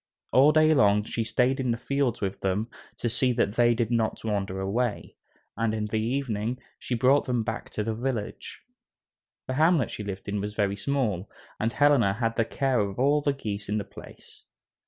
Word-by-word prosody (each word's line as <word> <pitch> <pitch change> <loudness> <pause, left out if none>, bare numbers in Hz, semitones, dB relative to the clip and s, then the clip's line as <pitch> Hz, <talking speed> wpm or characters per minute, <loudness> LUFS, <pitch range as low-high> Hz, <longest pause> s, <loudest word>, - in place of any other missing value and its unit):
All 140 +4 +6
day 155 0 +5
long 105 -6 +4
she 115 +1 -3
stayed 125 +4 +1
in 130 -2 -1
the 115 - +1
fields 135 0 -1
with 95 -1 -3
them 100 +4 -1 0.3
to - - -2
see 125 +2 +2
that 115 -4 0
they 120 0 +3
did 115 0 -1
not 115 -2 0
wander 100 -3 -2
away, 105 +4 -2 0.4
and 115 -1 0
in 105 -1 -2
the 110 +1 -1
evening 120 -1 -2 0.2
she 125 - -3
brought 130 +4 +3
them 125 -3 0
back 110 +2 -5
to 105 - -3
the 110 +1 -2
village. 115 -2 -4 0.8
The 130 - -3
hamlet 155 -2 +3
she 105 - -5
lived 100 -1 -6
in 100 0 -2
was 105 +1 -5
very 100 -2 0
small, 105 -5 -1 0.3
and 115 +1 0
Helena 135 -8 +4
had 115 0 -1
the 115 - +1
care 130 +1 0
of 100 -2 -2
all 145 +4 +3
the 145 - +1
geese 105 -7 -5
in 105 - 0
the 105 - -2
place. - - -14
115 Hz, 200 wpm, -27 LUFS, 105-130 Hz, 0.8 s, All